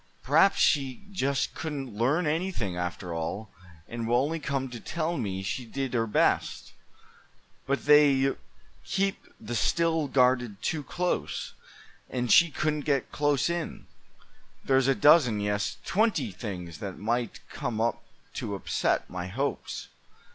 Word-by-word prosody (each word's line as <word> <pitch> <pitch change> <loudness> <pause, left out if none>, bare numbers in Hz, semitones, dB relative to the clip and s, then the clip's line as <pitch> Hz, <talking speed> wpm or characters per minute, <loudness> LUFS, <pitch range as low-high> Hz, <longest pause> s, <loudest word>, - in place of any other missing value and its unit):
Perhaps 195 - +4
she 135 0 +2
just 140 -7 0
couldn't 140 -7 -5
learn 135 +10 +2
anything, 155 - -1
after 90 0 -4
all, 85 +6 -4 0.4
and 115 -1 -4
will 120 +1 +3
only 160 +3 -2
come 140 -2 -2
to 120 - -6
tell 170 +6 -2
me 95 - -3
she 125 +6 -3
did 135 +2 -4
her 115 -2 +1
best; 105 - +1 0.9
but 140 +1 -1
they 140 -2 +5 0.5
keep 195 0 -1
the 115 +2 -6
Still 160 +8 +1
guarded 125 -5 +2
too 160 - -1
close, 180 +5 -2 0.6
and 125 -2 -1
she 170 -1 +7
couldn't 150 0 -1
get 140 -4 0
close 145 -2 +1
in. 170 -2 -3 0.8
There's 135 -1 +3
a 135 - +4
dozen, 145 -8 +5
yes, 105 0 -1
twenty 215 +4 +1
things 90 - -7
that 100 -2 -6
might 115 +2 -2
come 110 - -3
up 115 0 0 0.3
to 100 - -4
upset 95 - 0
my 90 0 -5
hopes. 135 +10 -3
135 Hz, 140 wpm, -28 LUFS, 110-150 Hz, 0.9 s, she